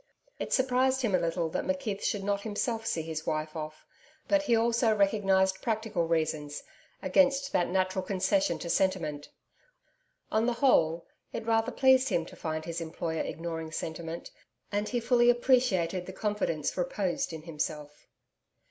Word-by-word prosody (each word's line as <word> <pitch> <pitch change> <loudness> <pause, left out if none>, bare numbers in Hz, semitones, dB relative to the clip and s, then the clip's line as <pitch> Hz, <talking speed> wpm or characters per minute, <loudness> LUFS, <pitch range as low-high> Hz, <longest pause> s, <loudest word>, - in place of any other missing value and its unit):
It - - -4
surprised 260 0 +2
him 220 -5 +1
a 185 - +4
little 170 0 0
that - - -2
McKeith 275 -8 -2
should 205 -2 -1
not 200 0 0
himself 225 +1 -2
see 160 - -1
his 160 -1 -5
wife 155 0 -2
off; 155 -1 -6 0.4
but 300 -1 +3
he 245 -5 +2
also 230 0 +3
recognised 195 -2 +2
practical 220 -7 -1
reasons 155 -3 -1 0.4
against 275 0 +3
that 175 - +2
natural 185 0 0
concession 195 +10 +1
to - - -6
sentiment. 170 -6 0 1.0
On 220 +2 +2
the 245 - +2
whole, 170 - +3 0.3
it - - -4
rather 225 +1 +2
pleased 260 0 +4
him 170 -5 0
to - - -12
find 155 -1 -4
his 170 0 -4
employer 160 0 -3
ignoring 165 -1 -4
sentiment, 165 +1 -5 0.4
and 205 +1 -1
he 245 - 0
fully 240 0 +4
appreciated 235 -8 +2
the 190 - -7
confidence 205 -8 -1
reposed 180 0 -1
in 160 -1 -7
himself. 150 -2 -5
190 Hz, 155 wpm, -29 LUFS, 165-230 Hz, 1.0 s, a